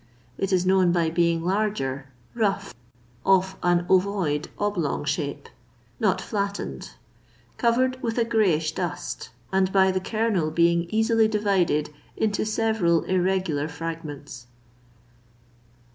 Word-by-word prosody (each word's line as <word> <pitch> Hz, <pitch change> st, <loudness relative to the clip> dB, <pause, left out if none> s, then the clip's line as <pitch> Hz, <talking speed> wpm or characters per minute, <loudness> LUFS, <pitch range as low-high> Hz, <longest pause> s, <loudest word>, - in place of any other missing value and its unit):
It 195 Hz, 0 st, -2 dB
is 185 Hz, -1 st, +2 dB
known 185 Hz, -1 st, +4 dB
by 170 Hz, -2 st, +1 dB
being 170 Hz, -1 st, +1 dB
larger, 180 Hz, -10 st, -1 dB, 0.3 s
rough, 200 Hz, -3 st, -1 dB, 0.5 s
of 190 Hz, 0 st, +3 dB
an 175 Hz, 0 st, +2 dB
ovoid, 185 Hz, -6 st, +1 dB
oblong 180 Hz, -9 st, -1 dB
shape, 145 Hz, -1 st, -3 dB, 0.5 s
not 200 Hz, -4 st, +2 dB
flattened, 200 Hz, -, -4 dB, 0.6 s
covered 255 Hz, +2 st, +1 dB
with 230 Hz, -2 st, -2 dB
a 235 Hz, -, +2 dB
greyish 185 Hz, -9 st, +2 dB
dust, 170 Hz, -5 st, -4 dB, 0.2 s
and 190 Hz, 0 st, +2 dB
by 190 Hz, -1 st, +4 dB
the 185 Hz, -, 0 dB
kernel 215 Hz, -6 st, 0 dB
being 170 Hz, +1 st, +2 dB
easily 220 Hz, +1 st, +3 dB
divided 195 Hz, -8 st, +1 dB, 0.3 s
into 215 Hz, 0 st, 0 dB
several 215 Hz, -7 st, +1 dB
irregular 185 Hz, -5 st, 0 dB
fragments. 150 Hz, -5 st, -7 dB
185 Hz, 115 wpm, -25 LUFS, 165-210 Hz, 0.6 s, known